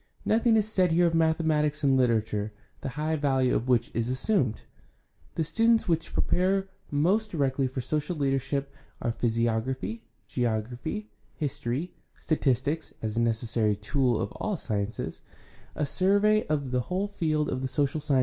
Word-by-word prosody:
Nothing 225 +1 +3
is 215 -1 +3
said 185 -5 +2
here 175 +2 +4
of 170 - +2
mathematics 160 -2 +2
and 135 -1 +4
literature, 110 -4 +1 0.3
the - - -4
high 155 +1 0
value 135 -4 +2
of 125 - -1
which 120 -2 +2
is 115 +1 -1
assumed. 130 - +1 0.7
The 165 - +1
studies 225 +8 +3
which 165 -1 0
pre - - +2
pare 190 +2 +1 0.2
most 185 +10 +2
directly 135 -4 0
for 130 0 -4
social 150 +6 -2
leadership 140 0 -1 0.3
are 120 - -1
physiography, 115 -1 -1 0.2
geography, 120 - -2 0.2
history, 145 +1 -3 0.2
statistics 145 +1 0
(as 110 0 -2
a - - +1
necessary 110 -2 +1
tool 120 +3 +1
of 100 - -2
all 215 - -3
the - - -5
sciences), 105 -5 -3 0.5
a 150 - 0
survey 205 +6 +3
of 145 -4 -1
the 125 - +2
whole 185 +9 -2
field 155 -6 0
of 130 - -2
the 130 - -1
social 140 +2 0
sciences. 140 -2 +2
140 Hz, 160 wpm, -28 LUFS, 120-165 Hz, 0.7 s, here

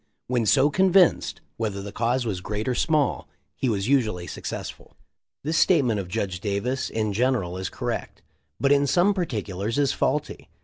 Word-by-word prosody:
When 120 -3 0
so 140 +4 +4
convinced, 190 0 +3 0.2
whether 105 -3 -2
the 100 +1 -6
cause 120 +3 0
was 95 -5 -3
great 105 +4 -4
or 130 - +1
small 150 +1 +1 0.3
he 130 - -1
was 100 -2 -1
usually 110 -10 +1
successful."* - - -7 0.5
This 160 +3 +1
statement 130 - +3
of 95 - -5
Judge 95 -2 -3
Davis 105 +7 -2
in 110 -2 -1
general 115 -6 0
is 95 0 -3
cor - - -4
rect, - - -5 0.4
but 140 - +2
in 140 0 +4
some 180 +7 +3
particulars 110 - -3
is 140 -2 +2
faulty. - - -2
120 Hz, 170 wpm, -25 LUFS, 100-140 Hz, 0.5 s, so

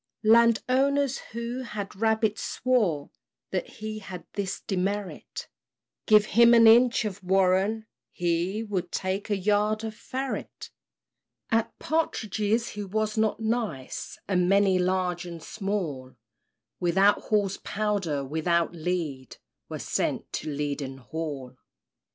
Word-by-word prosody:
Land 230 +1 +5
owners, 275 +1 +2
who 235 +2 -4
had 210 -6 -6
rabbits, 220 0 +1
swore 205 - 0 0.4
That 185 - -2
he 215 0 -6
had 190 -3 -9
this 200 -2 -3
demerit 195 +1 -3 0.6
Give 215 -1 +6
him 235 +2 +6
an 230 -1 +7
inch 235 +1 +6
of 200 -1 -5
warren, 190 +4 +2 0.3
he 175 +5 -1
Would 185 -5 -3
take 190 +3 -2
a 205 - +1
yard 210 +2 +1
of 220 -1 -4
ferret. 260 +4 -5 0.8
At 225 -1 +1
partridges 225 - 0
he 210 - -5
was 215 +2 -1
not 220 0 +1
nice; 220 - -3
And 180 -2 +2
many, 195 -1 +4
large 180 -1 0
and 170 -2 -8
small, 175 - -4 0.6
Without 190 +4 +3
Hall's 205 -3 +1
powder, 195 -9 -1
without 165 +4 0
lead, 160 -6 -3 0.3
Were - - -4
sent - - -2
to - - -3
Leaden 140 -2 -3
Hall. 135 -2 -6
200 Hz, 120 wpm, -27 LUFS, 175-220 Hz, 0.8 s, an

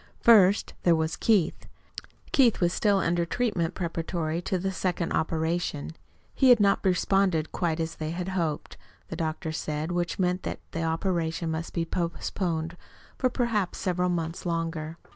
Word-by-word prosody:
First 205 -4 +6
there 170 -2 +4
was 160 0 -1
Keith. 200 -8 +1 0.6
Keith 250 -5 +4
was 175 -1 +2
still 205 -2 +2
under 170 -1 +1
treatment 170 -3 -1
preparatory 165 -1 -2
to 185 +1 -1
the 190 +2 -2
second 180 -2 -2
operation. 160 -1 -1 0.4
He 265 - +4
had 245 -2 +8
not 200 -1 +3
responded 185 -3 +2
quite 170 -3 -1
as 165 0 -2
they 155 -1 -5
had 175 +3 -3
hoped, 170 -5 -2 0.3
the - - -4
doctor 160 0 -3
said, 155 +1 -3
which 175 -1 -1
meant 180 0 +1
that - - -4
the 165 - -3
operation 165 0 -1
must 160 +1 -4
be 165 -1 0
postponed 170 -1 -2 0.4
for 255 - +3
perhaps 230 -7 -1
several 180 -1 0
months 165 -1 -2
longer. 165 -2 -3
170 Hz, 155 wpm, -27 LUFS, 165-190 Hz, 0.6 s, had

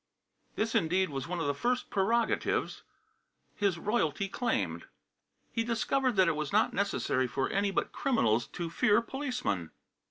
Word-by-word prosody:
This, 225 +1 -1
indeed, 185 +2 +2
was 135 0 -4
one 180 0 -3
of 165 - -1
the 145 - +1
first 245 - -1
prerogatives 225 +4 +1 0.7
his 200 -4 0
royalty 195 -2 0
claimed. 240 +5 -2 0.6
He 230 - 0
discovered 240 +2 0
that 190 -2 +5
it 170 - +2
was 150 -1 -3
not 215 +2 +3
necessary 140 -10 0
for 130 +2 -1
any 200 +1 +1
but 195 - -1
criminals 120 - +1
to 170 -2 -5
fear 210 +6 +3
policemen. 230 - -3
195 Hz, 150 wpm, -30 LUFS, 155-230 Hz, 0.7 s, that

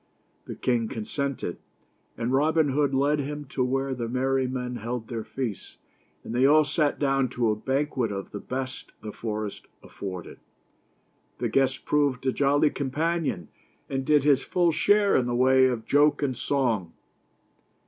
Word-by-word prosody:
The - - -7
king 120 -3 0
consented, 120 - -3 0.6
and 115 +3 -1
Robin 155 +2 +3
Hood 140 0 +1
led 140 +2 +2
him 145 +1 -4
to 130 - -1
where 135 +1 -1
the 120 -3 -4
merry 130 +1 +1
men 125 -1 -4
held 115 0 -4
their 115 -2 -4
feasts, 110 -2 -5 0.5
and - - -6
they 125 +2 +2
all 150 +3 +6
sat 150 0 0
down 135 -2 +1
to 120 -2 +1
a - - 0
banquet 130 0 -1
of 100 -1 -5
the 105 - -5
best 130 +2 -5
the 105 - -5
forest 105 -2 -5 0.2
afforded. 95 -3 -7 1.0
The - - -1
guest 130 -1 +1
proved 140 -3 +1
a 130 - +3
jolly 145 +2 +3
companion, 145 - -2 0.4
and 135 -1 -1
did 150 0 +3
his 140 -2 +4
full 175 -2 +2
share 205 +5 +3
in 125 - +2
the 120 - -1
way 130 +1 +5
of 120 -3 -2
joke 145 +1 +3
and 130 -3 0
song. 115 -13 -1
130 Hz, 160 wpm, -26 LUFS, 120-145 Hz, 1.0 s, all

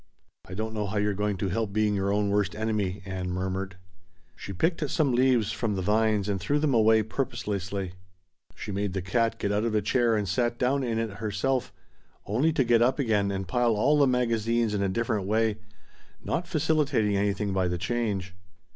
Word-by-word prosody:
"I 90 - -6
don't 110 +2 -3
know 105 -2 -2
how 105 +2 -3
you're 105 0 +1
going 105 0 -1
to 95 0 -2
help 105 +1 -2
being 105 0 +2
your 100 0 0
own 100 0 +1
worst 100 0 0
enemy," 105 -3 -2
Ann 95 -1 -4
murmured. 95 +1 -3 0.6
She - - -8
picked 155 - 0
some 140 -4 +1
leaves 120 -4 +3
from 110 -1 -2
the 95 - -2
vines 105 0 +2
and 100 -2 -1
threw 145 - +1
them 150 -2 +1
away, 110 -1 +4
purposelessly; 100 -5 -3 0.6
she - - -6
made 100 -1 -2
the 95 -2 -3
cat 115 +5 0
get 100 - -1
out 105 +1 +1
of 115 -2 0
a 105 - +3
chair 120 +2 +2
and 105 -2 -1
sat 120 +6 0
down 135 +2 +1
in 115 -3 -1
it 110 -4 -3
herself, 110 +2 -1 0.5
only 130 +11 +1
to 150 -4 +2
get 120 -1 +3
up 125 +3 +3
again 110 -7 +1
and 95 -1 -3
pile 120 +3 +2
all 140 +8 +3
the 140 - +5
magazines 115 -2 +1
in 100 - 0
a 100 - +1
different 105 -1 -1
way, 110 0 +1 0.6
not - - -2
facilitating 140 -10 +1
anything 100 0 0
by 95 -1 +1
the 90 0 -1
change. 100 -1 -2
105 Hz, 200 wpm, -27 LUFS, 100-120 Hz, 0.6 s, the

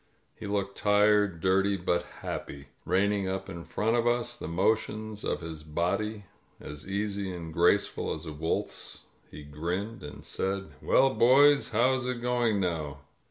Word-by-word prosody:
He - - -8
looked 100 -1 -2
tired, 105 -3 +3
dirty, 95 +2 +2
but 90 -1 0 0.2
happy. 70 0 -6 0.2
Reining 100 +1 +1
up 95 0 -3
in 85 -3 -7
front 115 +2 0
of 120 0 +2
us, 120 0 +1
the - - -7
motions 110 +4 -1
of - - -1
his 80 -2 -7
body 100 +7 -2 0.3
as 75 +3 -9
easy 100 0 -2
and 85 -3 -7
graceful 85 +5 +2
as 80 - -9
a 80 - -6
wolf's, 80 +2 -3 0.3
he 75 - -10
grinned 90 +10 -4
and 75 0 -9
said, 95 +1 -3
"Well, 135 0 +4
boys, 140 +4 +5
how 120 +4 +3
is 130 -1 -1
it 125 -1 -2
going 120 -3 +1
now?" 80 -6 -2
100 Hz, 160 wpm, -29 LUFS, 85-110 Hz, 0.3 s, boys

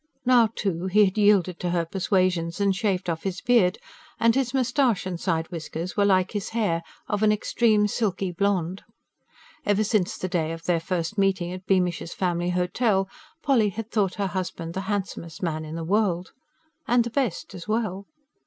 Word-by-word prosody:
Now, 240 -3 +5
too, 185 -2 -2
he 210 +3 +5
had 190 - -1
yielded 205 -4 +3
to 180 - -2
her 170 -1 0
persuasions 180 -1 0
and 200 -1 +2
shaved 195 -3 -1
off 165 -2 -2
his 190 -2 -3
beard; 225 -7 +3 0.4
and 230 0 +4
his 260 -1 0
moustache 255 -5 +1
and 180 -2 -4
side 165 -3 -1
whiskers 165 +1 -5
were 205 - +3
like 190 -2 +3
his 205 -3 -3
hair, 170 -7 +1 0.3
of 205 0 -1
an 215 -1 +5
extreme, 210 0 +2
silky 195 -3 -1
blond. 185 -1 -1 0.8
Ever 205 -3 +2
since 210 -4 0
the 185 - -3
day 165 -3 -1
of 165 0 -8
their 175 -2 +2
first 175 +3 -2
meeting 190 -3 +1
at 185 0 -8
Beamish's 180 -3 0
Family 175 -1 0
Hotel, 190 +3 +1 0.4
Polly 235 -7 +3
had 225 +3 -6
thought 200 -4 +1
her 200 - -1
husband 180 -3 -4
the 190 - -3
handsomest 185 -6 -4
man 155 -2 -1
in 155 +1 -7
the 165 - -4
world. 185 -1 0 0.6
And 240 0 +4
the 235 - -5
best, 240 - -2
as 180 -1 -9
well. 210 -3 -2
190 Hz, 180 wpm, -25 LUFS, 175-210 Hz, 0.8 s, Now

